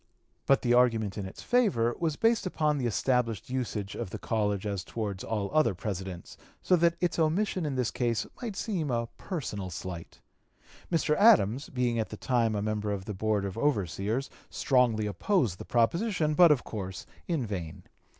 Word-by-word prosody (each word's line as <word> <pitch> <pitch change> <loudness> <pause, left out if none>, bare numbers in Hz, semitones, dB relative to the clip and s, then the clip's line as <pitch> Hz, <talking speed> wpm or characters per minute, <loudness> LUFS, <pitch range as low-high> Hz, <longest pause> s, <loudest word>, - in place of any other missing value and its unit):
But 135 - +4
the 120 -1 +3
argument 115 -5 +3
in 100 -2 -4
its 95 - -10
favor 190 - +2
was 160 -3 0
based 225 0 +2
upon 150 -4 0
the 125 - 0
established 120 -2 0
usage 110 -6 -3
of 115 -5 -5
the - - -5
College 105 -3 -1
as 100 -3 -2
towards 100 -4 -4
all 105 -3 -2
other 155 -10 +3
Presidents, 95 -2 -6 0.3
so 185 - +4
that 170 0 +3
its 175 -1 0
omission 170 +1 +1
in 140 - -2
this 125 -3 0
case 120 -3 0 0.2
might 230 -5 -4
seem 190 -8 -2
a 115 -2 -1
personal 105 - -4
slight. 85 -1 -7 0.7
Mr. 160 -2 +2
Adams, 145 - +5
being 125 -3 0
at 110 - -2
the 110 - -7
time 115 -3 +1
a 100 - -1
member 105 -1 -1
of 95 -2 -4
the 105 - -4
Board 105 0 0
of 100 +3 -5
Overseers, 110 - -1 0.2
strongly 120 -5 +2
opposed 105 - 0
the - - -7
proposition, 155 - +1
but 170 +1 +7
of 140 -4 +2
course 95 -4 -6 0.2
in 160 -8 0
vain. 90 -7 -5
115 Hz, 180 wpm, -29 LUFS, 105-150 Hz, 0.7 s, but